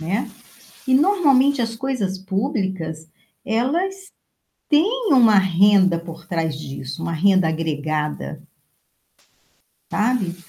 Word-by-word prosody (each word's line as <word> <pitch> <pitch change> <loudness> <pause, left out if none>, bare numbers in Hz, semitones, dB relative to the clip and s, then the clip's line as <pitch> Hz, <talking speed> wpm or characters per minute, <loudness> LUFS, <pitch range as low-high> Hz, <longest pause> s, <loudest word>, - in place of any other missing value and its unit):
Né. 190 +9 -2 0.6
E, 260 - +2
normalmente, 285 -4 +3
as 230 -1 -3
coisas 225 -7 -3
públicas, 190 - -3 0.4
elas 345 - -2 0.6
têm 420 +10 +2
uma 230 -6 +6
renda 190 -1 +4
por 170 0 -11
trás 165 -5 -2
disso, 135 +1 -7
uma 170 - -3
renda 185 +1 +3
agregada. 150 - -3 1.5
Sabe, 210 -5 0
195 Hz, 95 wpm, -21 LUFS, 165-260 Hz, 1.5 s, uma